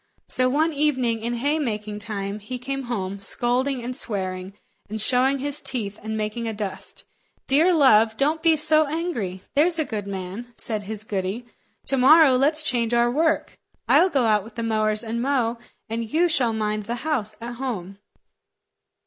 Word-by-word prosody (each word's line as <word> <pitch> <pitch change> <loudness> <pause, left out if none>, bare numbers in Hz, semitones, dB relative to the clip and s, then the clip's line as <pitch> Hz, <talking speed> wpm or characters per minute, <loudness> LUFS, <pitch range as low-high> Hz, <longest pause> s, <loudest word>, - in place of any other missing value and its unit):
So 255 0 +1
one 310 +4 +1
evening 260 -6 +1
in 235 +2 -2
haymaking 230 -6 -2
time, 205 -1 -4
he 250 +5 -6
came 270 +2 -4
home, 200 -5 -4
scolding 245 +5 -1
and 250 +1 -4
swearing, 190 -5 -3 0.3
and 220 +1 -4
showing 255 +5 +3
his 285 +2 -3
teeth 210 -5 -3
and 220 +1 -4
making 215 +2 -3
a 220 - -3
dust. 205 -2 -6 0.4
"Dear 310 +7 +4
love, 225 -8 +4
don't 305 +3 +1
be 325 -1 +4
so 310 0 +5
angry; 280 - -3
there's 330 +4 +3
a 315 - 0
good 210 -5 -5
man," 195 +5 -6
said 215 -2 -1
his 210 +1 -6
goody; 200 +3 -3 0.4
"to 270 - +1
morrow 280 +1 +7
let's 300 +4 +2
change 240 -4 0
our 240 0 +3
work. 320 +4 0 0.3
I'll 370 - +5
go 275 -7 +1
out 210 -2 +3
with 220 +1 -14
the 230 - -3
mowers 215 -1 +1
and 230 +1 -3
mow, 245 -3 0 0.3
and 225 0 -4
you 340 +3 +3
shall 265 -8 +1
mind 215 -1 -2
the 235 - -2
house 225 -9 -1
at 235 +1 -7
home." 200 -7 -5
235 Hz, 175 wpm, -23 LUFS, 215-275 Hz, 0.4 s, morrow